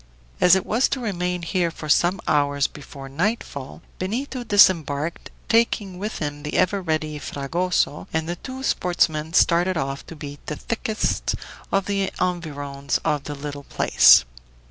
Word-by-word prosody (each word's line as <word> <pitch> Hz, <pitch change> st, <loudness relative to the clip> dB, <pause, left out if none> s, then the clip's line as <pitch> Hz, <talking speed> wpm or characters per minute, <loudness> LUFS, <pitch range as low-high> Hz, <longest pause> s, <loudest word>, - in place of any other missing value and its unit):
As 180 Hz, +1 st, +7 dB
it 190 Hz, -, 0 dB
was 235 Hz, +5 st, +2 dB
to 270 Hz, -, -1 dB
remain 180 Hz, -6 st, -2 dB
here 175 Hz, 0 st, 0 dB
for 160 Hz, -1 st, -8 dB
some 175 Hz, +5 st, +3 dB
hours 145 Hz, -1 st, +2 dB
before 140 Hz, -1 st, -8 dB
nightfall, 145 Hz, -, -3 dB, 0.2 s
Benito 245 Hz, +7 st, -3 dB
disembarked, 170 Hz, -, +3 dB, 0.2 s
taking 215 Hz, -5 st, +1 dB
with 210 Hz, +2 st, -4 dB
him 145 Hz, -1 st, -4 dB
the 150 Hz, 0 st, -5 dB
ever 195 Hz, +2 st, +2 dB
ready 155 Hz, -3 st, -2 dB
Fragoso, 155 Hz, +3 st, -1 dB
and 160 Hz, 0 st, -1 dB
the 175 Hz, +1 st, -3 dB
two 260 Hz, +5 st, -8 dB
sportsmen 165 Hz, -, 0 dB
started 175 Hz, +2 st, +3 dB
off 135 Hz, -2 st, -3 dB
to 165 Hz, -, -9 dB
beat 145 Hz, -1 st, -9 dB
the 150 Hz, -, -3 dB
thickets 220 Hz, +4 st, -2 dB, 0.5 s
in 195 Hz, -, +2 dB
the 195 Hz, -1 st, 0 dB
environs 145 Hz, -6 st, -2 dB
of 150 Hz, -1 st, 0 dB
the 145 Hz, -, -5 dB
little 145 Hz, 0 st, -7 dB
place. -, -, +6 dB
170 Hz, 150 wpm, -23 LUFS, 145-190 Hz, 0.5 s, As